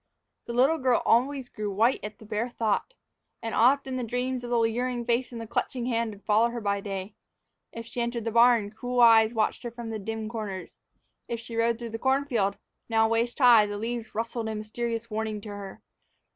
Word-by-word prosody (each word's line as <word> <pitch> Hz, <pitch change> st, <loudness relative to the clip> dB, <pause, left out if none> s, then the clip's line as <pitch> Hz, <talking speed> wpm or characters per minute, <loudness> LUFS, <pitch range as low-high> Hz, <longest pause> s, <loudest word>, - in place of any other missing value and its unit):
The 235 Hz, -, -4 dB
little 270 Hz, +7 st, +3 dB
girl 255 Hz, -3 st, +2 dB
always 260 Hz, +2 st, +2 dB
grew 210 Hz, -3 st, -4 dB
white 225 Hz, +6 st, +2 dB
at 210 Hz, 0 st, -6 dB
the 220 Hz, -, -14 dB
bare 215 Hz, +3 st, -2 dB
thought. 230 Hz, -, -1 dB, 0.5 s
And 225 Hz, -, -3 dB
often 265 Hz, +2 st, +3 dB
the 250 Hz, -, -2 dB
dream 250 Hz, +3 st, -2 dB
of 255 Hz, -, -3 dB
the 240 Hz, -, +2 dB
leering 240 Hz, +2 st, 0 dB
face 240 Hz, +2 st, 0 dB
and 235 Hz, -, -6 dB
the 225 Hz, -, -5 dB
clutching 240 Hz, +2 st, -2 dB
hand 230 Hz, -2 st, 0 dB
would 205 Hz, -1 st, -11 dB
follow 220 Hz, +2 st, +3 dB
her 240 Hz, 0 st, -4 dB
by 200 Hz, -2 st, -1 dB
day. 195 Hz, 0 st, -5 dB, 0.6 s
If 230 Hz, 0 st, -7 dB
she 240 Hz, +1 st, -4 dB
entered 235 Hz, -1 st, -2 dB
the 230 Hz, -, -2 dB
barn, 235 Hz, -3 st, +4 dB
cruel 245 Hz, +3 st, -3 dB
eyes 225 Hz, -1 st, +7 dB
watched 215 Hz, -1 st, 0 dB
her 240 Hz, -, -4 dB
from 235 Hz, -1 st, -7 dB
out 215 Hz, -2 st, -5 dB
dim 220 Hz, +1 st, -4 dB
corners; 210 Hz, -5 st, -6 dB, 0.5 s
if 235 Hz, -, -3 dB
she 230 Hz, 0 st, -9 dB
rode 230 Hz, 0 st, +2 dB
through 235 Hz, -1 st, -7 dB
the 225 Hz, -, -5 dB
corn 265 Hz, +3 st, +2 dB
field, 205 Hz, -7 st, 0 dB, 0.3 s
now 225 Hz, -1 st, +3 dB
waist 230 Hz, +2 st, 0 dB
high, 240 Hz, -6 st, +7 dB
the 205 Hz, 0 st, -4 dB
leaves 230 Hz, 0 st, -4 dB
rustled 230 Hz, 0 st, -2 dB
a 220 Hz, -, -3 dB
mysterious 230 Hz, +2 st, -4 dB
warning 215 Hz, 0 st, -2 dB
to 210 Hz, -, -9 dB
her. 200 Hz, -1 st, -8 dB
230 Hz, 215 wpm, -27 LUFS, 215-240 Hz, 0.6 s, eyes